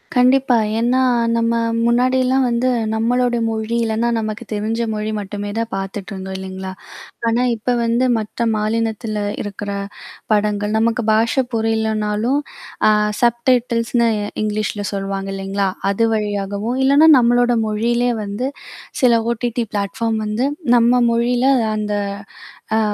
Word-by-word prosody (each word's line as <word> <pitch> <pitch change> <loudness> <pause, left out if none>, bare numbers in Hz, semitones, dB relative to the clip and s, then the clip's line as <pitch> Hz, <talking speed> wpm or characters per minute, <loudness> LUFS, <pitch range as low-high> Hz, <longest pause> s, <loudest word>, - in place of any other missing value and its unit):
கண்டிப்பா. 255 0 +4 0.2
ஏன்னா, 245 +2 +2 0.4
நம்ம 230 0 +1 0.3
முன்னாடிலாம் 255 +2 +2
வந்து, 240 +2 0 0.3
நம்மளோடய 240 +1 +1
மொழி 220 +1 -2
இல்லைனா 225 +1 0
நமக்கு 215 -1 -3
தெரிஞ்ச 220 +2 -2
மொழி 215 0 -3
மட்டுமே 205 0 -5
தான் 230 0 -1
பாத்துட்டு 195 +1 -5
இருந்தோம், 190 0 -6
இல்லைங்களா? 190 0 -6 0.6
ஆனா, 230 +2 +2
இப்ப 245 +3 -1
வந்து 235 +2 +1
மற்ற 220 +2 -3
மாநிலத்தில 215 0 -1 0.2
இருக்கிற 205 0 -6 0.6
படங்கள், 210 0 0
நமக்கு 230 +1 +1
பாஷை 230 +4 +2
புரியலனாலும் 220 +2 0 0.5
அ - - +6 0.3
சப்டைட்டில்ஸ்ன்னு 235 -1 +2 0.4
இங்கிலீஷ்ல 210 -1 -2
சொல்வாங்க, 195 0 -3
இல்லைங்களா? 195 +1 -1 0.2
அது 230 +3 +1
வழியாகவும், 205 +3 -2
இல்லைனா 290 +4 +6
நம்மளோடய 245 -1 +3
மொழியிலேயே 235 +3 0
வந்து 205 +6 -3 0.5
சில 250 -2 +5 0.2
OTT 240 +1 -2
பிளாட்ஃபார்ம்ஸ் 220 +2 -1
வந்து 225 +6 0 0.3
நம்ம 240 +1 +4
மொழியில் 240 +2 +2 0.3
அந்த 210 -1 -3 0.9
அ - - +3
225 Hz, 120 wpm, -19 LUFS, 210-240 Hz, 0.9 s, அ